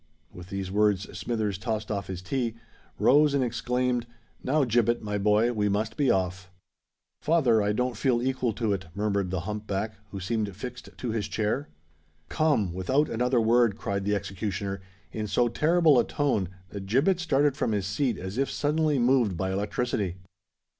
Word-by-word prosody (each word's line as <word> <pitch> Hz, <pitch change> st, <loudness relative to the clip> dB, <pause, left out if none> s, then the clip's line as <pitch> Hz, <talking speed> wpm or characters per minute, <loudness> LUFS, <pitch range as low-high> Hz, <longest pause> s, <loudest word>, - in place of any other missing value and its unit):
With 90 Hz, 0 st, -11 dB
these 95 Hz, -1 st, -4 dB
words 105 Hz, -1 st, +1 dB
Smithers 110 Hz, -5 st, -2 dB
tossed 110 Hz, -1 st, -3 dB
off 100 Hz, -2 st, -3 dB
his 90 Hz, -1 st, -6 dB
tea, 115 Hz, +3 st, -2 dB, 0.4 s
rose, 145 Hz, +1 st, +4 dB
and 135 Hz, -, +2 dB
exclaimed, 125 Hz, 0 st, -1 dB, 0.4 s
"Now, 145 Hz, +3 st, +2 dB
Gibbet, 120 Hz, -1 st, +2 dB
my 105 Hz, -1 st, -2 dB
boy, 105 Hz, +4 st, +3 dB
we 105 Hz, -2 st, +1 dB
must 105 Hz, +2 st, -1 dB
be 140 Hz, -3 st, +2 dB
off." 95 Hz, 0 st, 0 dB, 0.7 s
"Father, 135 Hz, -9 st, +3 dB
I 105 Hz, 0 st, +1 dB
don't 125 Hz, +3 st, -1 dB
feel 120 Hz, +2 st, +1 dB
equal 130 Hz, -1 st, 0 dB
to 110 Hz, -1 st, 0 dB
it," 95 Hz, -2 st, -4 dB
murmured 100 Hz, -2 st, 0 dB
the 90 Hz, -1 st, -2 dB
hump 105 Hz, +3 st, -5 dB
back, 105 Hz, +3 st, -2 dB, 0.2 s
who 100 Hz, -, -6 dB
seemed 100 Hz, +1 st, -2 dB
fixed 125 Hz, +5 st, -8 dB
to 120 Hz, -, -3 dB
his 110 Hz, -3 st, -2 dB
chair. 110 Hz, +6 st, -1 dB, 0.6 s
"Come—without 130 Hz, -, +1 dB
another 125 Hz, +2 st, +1 dB
word!" 115 Hz, -2 st, +3 dB
cried 100 Hz, -3 st, -2 dB
the 105 Hz, +1 st, +1 dB
executioner, 100 Hz, 0 st, -3 dB, 0.3 s
in 110 Hz, -1 st, -3 dB
so 120 Hz, +5 st, +2 dB
terrible 155 Hz, +3 st, +4 dB
a -, -, +4 dB
tone 130 Hz, -, 0 dB, 0.2 s
that 100 Hz, -1 st, -7 dB
Gibbet 140 Hz, -, +2 dB
started 145 Hz, -4 st, +2 dB
from 125 Hz, -, -1 dB
his 100 Hz, -3 st, 0 dB
seat 115 Hz, +3 st, 0 dB
as 95 Hz, +6 st, -5 dB
if 135 Hz, -, +1 dB
suddenly 150 Hz, 0 st, +1 dB
moved 120 Hz, -6 st, +3 dB
by 95 Hz, +1 st, -1 dB
electricity. 100 Hz, -1 st, -1 dB
110 Hz, 170 wpm, -27 LUFS, 100-125 Hz, 0.7 s, rose